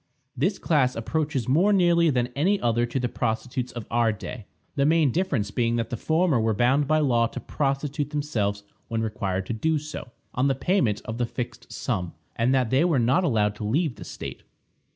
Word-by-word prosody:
This 180 - 0
class 135 -6 +2
approaches 145 +1 -1
more 170 +11 +4
nearly 170 -4 +4
than 125 -3 +1
any 190 +8 +2
other 120 0 +1
to 125 +3 -2
the 125 - 0
prostitutes 125 +3 -2
of 120 -3 -6
our 115 -1 +3
day, 110 +1 -7 0.3
the 140 - +2
main 155 -2 +4
difference 135 - 0
being 115 +1 +1
that 115 +1 -2
the - - -1
former 160 +2 +2
were 110 -1 +1
bound 130 +6 +3
by 155 +1 +3
law 120 -6 +3
to - - -7
prostitute 140 +1 -2
themselves 110 -10 -1 0.2
when 115 -1 -1
required 95 -3 -2
to 115 - -3
do 155 +8 +1
so, 150 -3 -7 0.2
on 130 +3 +1
the 135 - +2
payment 135 - +1
of 115 +2 -5
the 120 - +1
fixed 120 0 -6
sum, 95 -9 -3 0.2
and 115 +2 +2
that 130 -4 +2
they 135 +4 +4
were 170 -5 +2
not 130 +10 +3
allowed 105 - +2
to - - -6
leave 135 +5 0
the - - -8
state. - - -7
125 Hz, 200 wpm, -25 LUFS, 115-150 Hz, 0.3 s, more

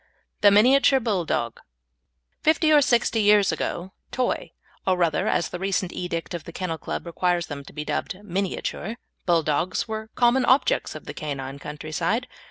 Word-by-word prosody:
THE 205 - +8
MINIATURE 260 +6 +5
BULLDOG 180 - -1 0.8
Fifty 315 0 +3
or 295 - +7
sixty 235 -3 +2
years 205 -1 +5
ago, 180 +2 -3 0.2
Toy 255 -1 -1 0.3
or, 185 -1 +2
rather, 170 -3 +1
as 170 - 0
a 180 - -3
recent 190 -1 -1
edict 175 -1 -4
of 170 -2 -5
the - - -8
Kennel 165 -2 -4
Club - - -5
requires 175 0 0
them 140 -1 -7
to - - -12
be 150 0 -6
dubbed, 155 +5 -3
Miniature 195 +3 -3 0.3
Bulldogs 170 +2 +1
were 220 0 -5
common 245 +1 +4
objects 260 +3 +2
of - - -9
the - - -6
canine 140 -2 -5
country 150 +2 -7
side. 200 +10 0
185 Hz, 165 wpm, -24 LUFS, 165-220 Hz, 0.8 s, THE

